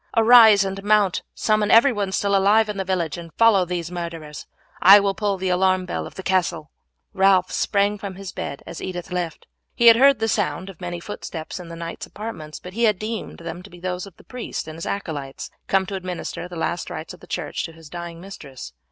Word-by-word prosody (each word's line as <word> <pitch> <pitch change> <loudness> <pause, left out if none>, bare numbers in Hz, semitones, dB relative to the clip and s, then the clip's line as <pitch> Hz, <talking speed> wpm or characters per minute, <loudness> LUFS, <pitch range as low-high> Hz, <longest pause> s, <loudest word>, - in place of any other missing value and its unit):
Arise 225 -3 +8
and 195 0 -5
mount, 205 -3 +3
summon 215 -1 +1
everyone 225 -5 +4
still 200 +1 +1
alive 210 +3 +4
in 210 - -4
the 195 - -1
village, 175 -4 -2
and 165 -1 -10
follow 220 -5 +5
these 175 -1 -4
murderers. 165 -4 -6 0.3
I 195 +3 +9
will 200 -1 +1
pull 200 -1 -1
the 190 0 -2
alarm 185 0 +2
bell 180 - -4
of - - -14
the 190 - -7
castle." 175 -5 0 0.4
Ralph 190 -2 +3
sprang 205 0 +1
from 195 -2 -6
his 195 -1 -7
bed 140 - -6
as - - -8
Edith 180 0 -6
left. 175 -3 -4 0.3
He 235 - +1
had 230 -1 +9
heard 275 +1 +6
the 225 - -1
sound 195 -3 -1
of 180 - -20
many 175 -1 -4
footsteps 170 -3 -7
in 180 - -9
the 170 - -7
knight's 165 0 -7
apartments, 180 -9 -7
but 180 - -10
had 220 -2 +2
deemed 215 +2 -5
them 170 +1 -6
those 180 0 -6
of 190 - -16
the - - -17
priest 250 -8 -6
and 155 - -7
his 165 - -6
acolytes 145 -9 -5 0.2
come 190 0 +2
to 195 - -7
administer 180 -1 -5
the 180 - -10
last 170 +1 -2
rites 160 - -7
of 180 - -14
the - - -15
church 155 -5 -3
to 165 - -8
his 165 -1 -14
dying 170 +1 -7
mistress. 145 - -10
185 Hz, 215 wpm, -22 LUFS, 170-205 Hz, 0.4 s, I